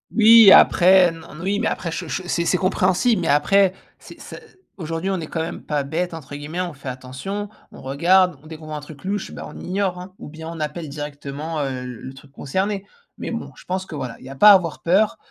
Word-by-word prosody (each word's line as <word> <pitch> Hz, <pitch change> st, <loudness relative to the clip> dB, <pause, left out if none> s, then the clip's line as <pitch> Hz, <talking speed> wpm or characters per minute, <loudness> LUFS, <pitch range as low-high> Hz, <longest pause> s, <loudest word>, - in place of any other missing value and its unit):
Oui, 225 Hz, -2 st, +8 dB
après, 180 Hz, -1 st, +6 dB
non, 165 Hz, -2 st, -12 dB
mais, 170 Hz, -, -9 dB
oui. 200 Hz, +2 st, 0 dB
Mais 230 Hz, -, 0 dB
après 170 Hz, -, -3 dB
che 170 Hz, +2 st, -5 dB
che 180 Hz, +3 st, -4 dB
c'est 170 Hz, -1 st, 0 dB
c'est 180 Hz, -, +2 dB
compréhensible. 185 Hz, +5 st, +1 dB
Mais, -, -, -2 dB
après, 185 Hz, +7 st, +3 dB, 0.3 s
c'est -, -, -14 dB
c -, -, -10 dB, 0.4 s
aujourd'hui, 165 Hz, +1 st, -4 dB
on 190 Hz, -2 st, -1 dB
est 160 Hz, -, -6 dB
quand 165 Hz, -, -3 dB
même 165 Hz, +2 st, -5 dB
pas 145 Hz, -2 st, -1 dB
«bête» 170 Hz, +5 st, -3 dB
entre 145 Hz, -3 st, -9 dB
guillemets. 155 Hz, +5 st, -5 dB
On 175 Hz, -2 st, -3 dB
fait 135 Hz, -1 st, -12 dB
attention. 130 Hz, +12 st, -6 dB, 0.2 s
On -, -, -12 dB
regarde, 175 Hz, +5 st, +2 dB
dès 160 Hz, -, -8 dB
qu'on 155 Hz, -, -13 dB
voit 155 Hz, -, -5 dB
un -, -, -5 dB
truc 145 Hz, -1 st, -13 dB
louche, 195 Hz, +1 st, -3 dB
ben, -, -, -8 dB
on -, -, -10 dB
ignore, 185 Hz, -1 st, -2 dB
hein, 185 Hz, +1 st, -10 dB
ou -, -, -9 dB
bien 160 Hz, +1 st, -9 dB
on 165 Hz, -1 st, -8 dB
appelle 150 Hz, +1 st, -4 dB
directement, 145 Hz, +2 st, -6 dB
heu, 135 Hz, -, -1 dB
l 125 Hz, -, -6 dB
le 130 Hz, -, -9 dB
truc 135 Hz, +1 st, -16 dB
concerné. 195 Hz, +8 st, -3 dB, 0.3 s
Mais -, -, -5 dB
bon, -, -, -5 dB
je -, -, -16 dB
pense 185 Hz, +1 st, -3 dB
que 155 Hz, -, -9 dB
voilà, 125 Hz, -4 st, -5 dB
il -, -, -14 dB
y -, -, -9 dB
a 135 Hz, -, -8 dB
pas 210 Hz, +9 st, +8 dB
à -, -, +10 dB
avoir 165 Hz, -9 st, +1 dB
peur. 195 Hz, +5 st, +2 dB
170 Hz, 245 wpm, -21 LUFS, 145-190 Hz, 0.4 s, à